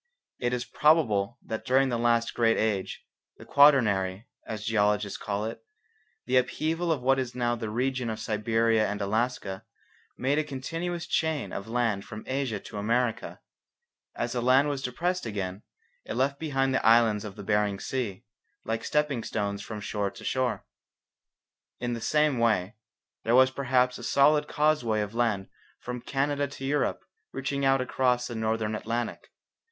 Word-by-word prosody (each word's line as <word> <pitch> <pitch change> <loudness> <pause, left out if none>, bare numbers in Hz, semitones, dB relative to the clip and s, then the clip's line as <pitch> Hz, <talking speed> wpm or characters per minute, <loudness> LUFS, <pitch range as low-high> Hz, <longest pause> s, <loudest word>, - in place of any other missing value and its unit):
It 120 -1 0
is 125 -1 -2
probable 120 -9 +2
that 110 - -4
during 130 +1 +3
the 120 -2 -1
last 115 0 +2
great 115 -1 +3
age, 105 -4 -1 0.3
the - - -12
Quaternary, 105 -9 +4 0.2
as 105 -1 -5
geologists 105 -2 +1
call 105 +1 -2
it, 115 0 -6 0.6
the 130 - +2
upheaval 160 +6 0
of 140 -6 -1
what 135 +1 +3
is 125 -2 -3
now 120 -1 0
the 115 -2 -5
region 125 +2 -1
of 110 0 -4
Siberia 110 0 +1
and 105 0 -3
Alaska, 105 -1 -1 0.5
made 140 +4 +1
a - - +1
continuous 165 +5 -4
chain 160 -4 -1
of 100 - -5
land 115 -4 0
from 110 +1 -9
Asia 130 -4 -2
to 105 - -7
America. 115 +2 -1 0.7
As 120 - -2
the 120 - -1
land 130 +4 +4
was 140 -2 -2
depressed 170 +5 -2
again 100 -2 -4 0.4
it - - -5
left 140 +2 0
behind 135 -4 0
it - - +3
the - - -6
islands 115 -2 +5
in 105 -3 -7
the - - -8
Bering 105 -2 +1
Sea, 105 -4 -3 0.4
like 115 +1 -2
stepping 150 -6 0
stones 100 -2 -2
from 110 +1 -6
shore 105 -1 -2
to 100 - -13
shore. 130 -1 -1 1.1
In 120 0 -2
the 115 - -4
same 150 -2 +2
way, 105 -4 +2 0.5
there 115 +2 +3
was 130 0 +6
perhaps 125 -2 +1
a - - -9
solid 150 +1 +4
causeway 145 -9 +1
of 105 0 -4
land 115 -5 0 0.3
from 125 0 -6
Canada 145 +2 0
to 135 -1 -8
Europe 145 0 0 0.3
reaching 140 +1 -3
out 135 -1 +4
across 125 -1 +1
the 120 - -5
Northern 110 -1 -1
Atlantic. 115 +2 -3
120 Hz, 165 wpm, -28 LUFS, 110-135 Hz, 1.1 s, was